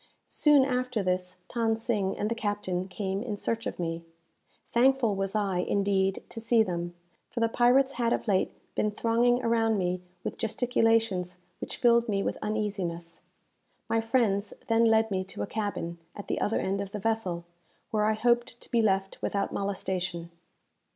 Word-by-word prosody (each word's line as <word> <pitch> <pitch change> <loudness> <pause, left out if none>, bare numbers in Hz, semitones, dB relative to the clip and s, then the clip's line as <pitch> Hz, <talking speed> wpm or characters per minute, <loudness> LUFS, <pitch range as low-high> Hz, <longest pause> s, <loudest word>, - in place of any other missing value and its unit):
Soon 295 -3 +4
after 250 -4 -1
this, 180 0 -1 0.2
Than 225 -2 +2
Sing 210 -4 -1
and 210 - -1
the 230 - 0
captain 205 -5 -2
came 195 +1 -3
in 215 -4 -4
search 230 +2 -2
of - - -5
me. 165 -1 -3 0.7
Thankful 250 -2 +4
was 195 +1 -2
I, 195 -4 +1
indeed, 195 0 +1
to 225 - -7
see 230 0 +4
them; 175 -3 -4 0.3
for - - -4
the 230 - +3
pirates 250 +4 +4
had 235 -3 0
of - - -1
late 190 -3 +2 0.2
been 210 - +1
thronging 235 +3 +2
around 225 -1 +2
me 180 -1 -1 0.2
with - - -5
gesticulations 225 -6 +1 0.2
which - - -5
filled 235 -1 +4
me 195 -1 +1
with - - -2
uneasiness. 195 -6 -3 0.7
My 225 - +2
friends 225 -4 +1
then 230 0 +3
led 220 -1 +4
me 190 -1 0
to 190 - -5
a - - -1
cabin, 200 -5 -3 0.2
at 205 - -7
the - - -1
other 220 - +1
end 195 +1 -1
of 200 +1 -6
the - - -2
vessel, 195 -6 -1 0.5
where 210 -1 +2
I 215 - +3
hoped 240 +2 +1
to - - -10
be 235 - +3
left 195 -2 0
without 200 -1 -1
molestation. 185 -3 -3
210 Hz, 170 wpm, -28 LUFS, 190-230 Hz, 0.7 s, Soon